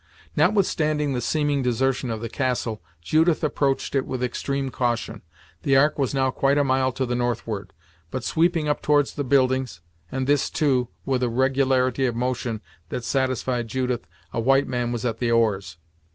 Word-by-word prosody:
Notwithstanding 155 -5 +2
the 125 - -1
seeming 145 +2 +1
desertion 125 +1 0
of 110 -1 -3
the 115 - -3
castle, 120 -3 -2 0.2
Judith 160 - +2
approached 140 -2 0
it 135 -2 +2
with 130 -1 -3
extreme 135 +2 -2
caution. 120 -4 -2 0.4
The 140 -4 +2
Ark 145 +2 +3
was 135 - +1
now 130 -1 +2
quite 140 +2 +2
a 145 - +4
mile 130 -1 +2
to 130 +1 -1
the 125 - -2
northward, 120 -4 -2 0.4
but 130 -1 -4
sweeping 165 0 +1
up 150 - 0
towards 145 -1 +2
the 145 - -2
buildings, 130 - +1 0.3
and 130 0 -1
this, 145 +1 +2
too, 130 -5 +1 0.2
with 130 -2 0
a 125 - +1
regularity 130 0 +2
of 120 - -2
motion 120 -2 -2 0.3
that 125 - -4
satisfied 130 -2 0
Judith 125 0 -2 0.3
a - - -1
white 135 +4 +3
man 120 -1 -1
was 120 -1 -3
at 115 -2 -1
the 120 - 0
oars. 100 -7 +1
130 Hz, 175 wpm, -24 LUFS, 120-140 Hz, 0.4 s, a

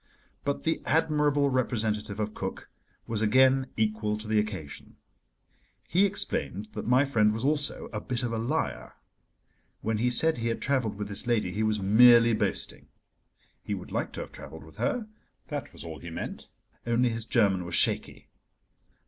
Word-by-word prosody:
But 140 0 -2
the 160 - 0
admirable 150 -3 +2
representative 110 -4 -1
of 105 0 -2
Cook - - -6 0.3
was 110 -2 -2
again 130 +4 +4
equal 105 -1 0
to 105 0 -7
the 110 0 +2
occasion. 95 -9 -6 0.9
He 195 +3 +4
explained 110 - -3
that 105 - -5
my 130 +3 +4
friend 110 -6 +3
was 110 +4 -3
also 145 0 0
a - - -3
bit 125 -1 -3
of 120 -1 -2
a 115 - -1
liar. 140 +8 -2 0.9
When 110 -1 -1
he 125 +2 +2
said 160 +3 +4
he 115 - -1
had 115 - -1
travelled 130 -7 0
with 105 0 -5
this 105 +4 -5
lady 110 -6 +1
he 105 - -3
was 110 -1 +1
merely 115 +4 +6
boasting. 105 -2 -3 0.7
He - - -3
would - - -9
like - - -2
to - - -5
have - - -8
travelled 80 - -10
with 80 - -16
her, 250 -6 -1 0.4
that - - -5
was - - -11
all 80 -2 -7
he 85 - -8
meant, 80 - -6 0.4
only 120 +1 +2
his 115 -1 -5
German 100 -6 +2
was 85 - -3
shaky. - - 0
115 Hz, 175 wpm, -28 LUFS, 105-130 Hz, 0.9 s, merely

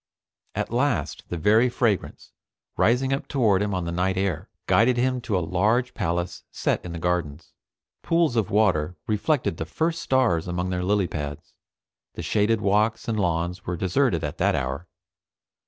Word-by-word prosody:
At - - -2
last 125 0 0
the 85 - -3
very 110 +9 +4
fragrance, 115 -5 -1 0.4
rising 130 +4 +2
up 135 - -3
toward 110 -8 +2
him 100 -2 -1
on 90 -2 -2
the 85 - -3
night 90 +2 0
air, 95 -5 -1 0.2
guided 120 +2 +4
him 130 0 +1
to 105 -5 -1
a 85 - -1
large 110 +9 +1
palace 85 +1 -2
set - - -1
in 90 - -6
gardens. 85 -3 -2 0.5
Pools 165 -6 +2
of 110 -4 +1
water 95 -6 +2
reflected 110 - 0
the 80 - -3
first 165 - -1
stars 115 -11 +2
among 90 +1 -2
their 90 0 -1
lilypads. 85 -7 -2 0.6
The - - -5
shaded 110 +1 +1
walks 105 +2 +1
and 110 -2 -1
lawns 90 0 -1
were 90 0 -2
deserted 95 - +1
at 75 - -4
that - - +2
hour. 65 +7 -3
100 Hz, 160 wpm, -25 LUFS, 85-120 Hz, 0.6 s, very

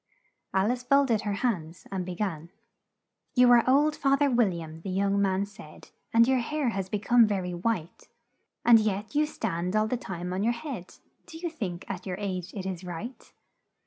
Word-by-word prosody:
Al 195 +4 +2
ice 250 0 -2
folded 250 -4 +3
her 205 -2 -2
hands, 170 -7 -2
and 190 -2 -2
be 180 - -4
gan: 170 -5 -3 0.9
"'You 250 -1 +6
are 240 -1 +7
old, 295 +3 +4
Fath 275 0 +2
er 280 - +3
Wil 240 -3 +4
liam,' 165 -2 -7
the 195 - -6
young 200 +1 +1
man 195 0 +1
said, 200 -6 -14 0.2
'And 230 +1 +5
your 260 -1 +3
hair 285 +2 -1
has 195 -4 -3
be 210 - 0
come 235 +2 +5
ver 200 -3 -1
y 180 - -3
white, 175 -1 -3 0.6
And 235 -1 +8
yet 210 0 -2
you 300 +1 +2
stand 180 - -3
all 215 0 +3
the 250 - -1
time 180 -4 -5
on 185 - -1
your 235 +2 +2
head 235 - -7 0.3
Do 320 - -10
you 340 0 -4
think, 195 - -5
at 190 0 -6
your 180 -1 -3
age, 185 -4 -4
it 190 -2 -5
is 190 -2 -4
right?' 180 +9 -7
205 Hz, 205 wpm, -28 LUFS, 185-245 Hz, 0.9 s, And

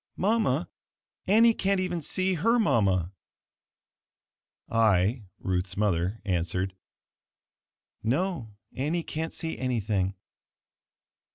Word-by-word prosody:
Mama, 190 - +1 0.6
Annie 225 +4 +6
can't 195 -2 +1
even 180 -2 -1
see 185 +5 0
her 225 +8 +2
mama!" 95 - +2 1.5
I 110 0 +2
(Ruth's 90 -1 -2
mother) 100 0 0
answered, 90 0 -1 1.3
"No, 135 - -1 0.2
Annie 155 +6 -1
can't 160 +1 -4
see 165 -1 -5
anything." 105 -7 0
115 Hz, 85 wpm, -28 LUFS, -, 1.5 s, Annie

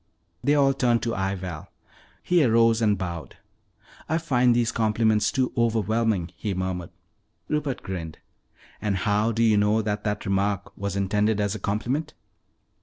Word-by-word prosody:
They 145 +1 +3
all 135 -2 +4
turned 120 -3 +1
to 115 - -1
eye 95 0 -1
Val. 90 -5 -7 0.5
He 175 -3 +3
arose 115 -1 +4
and 105 -2 +3
bowed. 85 -3 -6 0.7
"I 160 - +2
find 125 -7 +2
these 120 -1 +1
compliments 110 -1 +2
too 130 -2 0
overwhelming," 110 -5 +1
he 105 -3 -3
murmured. 90 -2 -3 0.6
Rupert 150 -3 -2
grinned. 85 -4 -6 0.6
"And 105 -3 0
how 105 +3 +1
do 115 +1 +1
you 110 -2 +4
know 105 +2 +2
that 105 -1 -2
that 105 -1 -2
remark 100 0 -1
was 100 -1 -4
intended 105 +2 +1
as 100 -1 0
a 110 - -5
compliment?" 125 +10 -2
110 Hz, 155 wpm, -25 LUFS, 100-115 Hz, 0.7 s, all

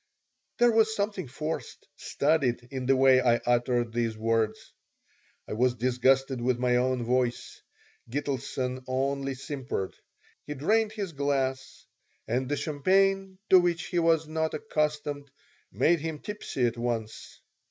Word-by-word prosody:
There 240 0 +5
was 220 -1 +3
something 200 -5 -2
forced, 155 +5 -5
studied, 140 -5 0
in 130 -2 -4
the 135 - +5
way 130 0 +6
I 120 -2 +4
uttered 120 -1 0
these 115 -2 -1
words. 110 -1 -1 0.7
I - - -5
was 125 +3 +2
disgusted 130 +2 +2
with 125 0 +1
my 125 0 +2
own 125 0 0
voice. 125 0 -1 0.5
Gitelson 130 -1 -3
only 135 +1 -1
simpered. 130 -7 -4 0.5
He 150 - -4
drained 215 +10 +1
his 200 -5 -4
glass, 135 -2 -2 0.4
and 125 +4 -1
the 145 - 0
champagne, 190 +6 +1
to 185 - +9
which 175 -1 0
he 175 - 0
was 165 -2 +2
not 160 0 -1
accustomed, 150 -5 -2 0.4
made 170 0 +3
him 160 0 -4
tipsy 180 -8 -3
at 120 0 -1
once. 115 -2 -4
135 Hz, 135 wpm, -28 LUFS, 125-160 Hz, 0.7 s, to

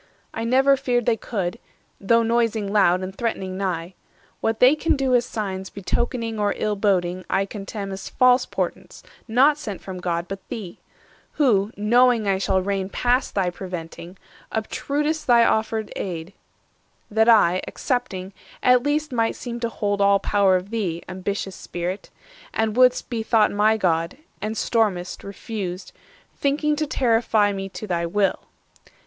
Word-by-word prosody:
I 225 - -3
never 265 +3 +4
feared 245 -3 0
they 235 - +3
could, 195 -5 -4 0.4
though 230 +3 +3
noising 225 -3 0
loud 185 -3 +4
And 190 +1 -6
threatening 195 -5 -3
nigh: 185 -2 -3 0.5
what 225 0 -1
they 255 +4 +6
can 320 +1 +1
do 270 -2 0
as 245 0 +3
signs 190 -3 -4
Betokening 225 +3 -2
or 205 -1 +1
ill 210 -1 -1
boding 185 -3 0
I 195 - +1
contemn 200 0 -6
490 - - -5
As 190 - -7
false 255 0 +4
portents, - - -4 0.2
not 270 +6 +4
sent 205 -9 -5
from 185 -1 -8
God, 170 -1 -2
but 195 +1 -5
thee; 200 -7 -7 0.5
Who, 215 -8 +2
knowing 235 +1 +3
I 195 -1 +2
shall 190 -1 +1
reign 195 -1 -2
past 250 +5 0
thy 185 -3 +1
preventing, 175 0 -8 0.3
Obtrud'st 295 +7 -2
thy 235 -2 +6
offered 220 -1 0
aid, 175 -1 -5 0.8
that 220 +2 +3
I, 185 -5 +5
accepting, 195 -7 -3 0.3
At 250 0 +5
least 295 +2 -1
might 230 -2 0
seem 240 -1 -6
to 235 -1 -1
hold 205 -3 -1
all 200 0 +5
power 195 -1 +2
of 185 +3 -3
thee, 185 -7 -2
Ambitious 190 +1 -4
Spirit! 175 +3 -5 0.5
and 220 -1 0
would'st 250 0 +4
be 235 -3 -3
thought 220 -1 +3
my 215 +2 +3
God; 170 0 0 0.2
And 215 +2 -3
storm'st, 205 -6 0
refused, 200 -2 -6 0.4
thinking 300 +2 +1
to 305 0 -1
terrify 225 -5 +2
Me 195 0 -5
to 205 - -7
thy 170 -3 -1
will! 195 +3 +1
210 Hz, 155 wpm, -23 LUFS, 190-235 Hz, 0.8 s, they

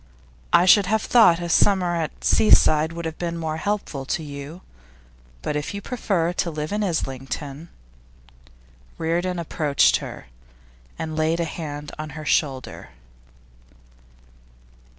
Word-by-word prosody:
I 175 - +5
should 195 +1 +6
have 220 +1 +1
thought 200 -8 +5
a 175 - -4
summer 180 0 +3
at 160 -2 -4
the - - -8
seaside 155 -7 +4
would 170 0 -6
have 160 0 -5
been 170 -1 -3
more 160 -1 -3
helpful 200 -7 -3
to 160 - -2
you; 145 +4 -8 0.8
but 150 - -2
if 150 +6 -3
you - - -3
prefer 195 -9 -1
to 175 - -1
live 150 -1 -4
in 210 +1 -1
Islington 145 -2 -4 0.6
' - - -28
Reardon 175 +3 -1
approached 150 -4 +2
her, - - -9 0.7
and 160 -1 -4
laid 160 +2 +1
a 170 - 0
hand 150 -3 -6
on 155 0 -5
her 155 - -7
shoulder. 135 -4 -1
160 Hz, 140 wpm, -23 LUFS, 145-175 Hz, 0.8 s, should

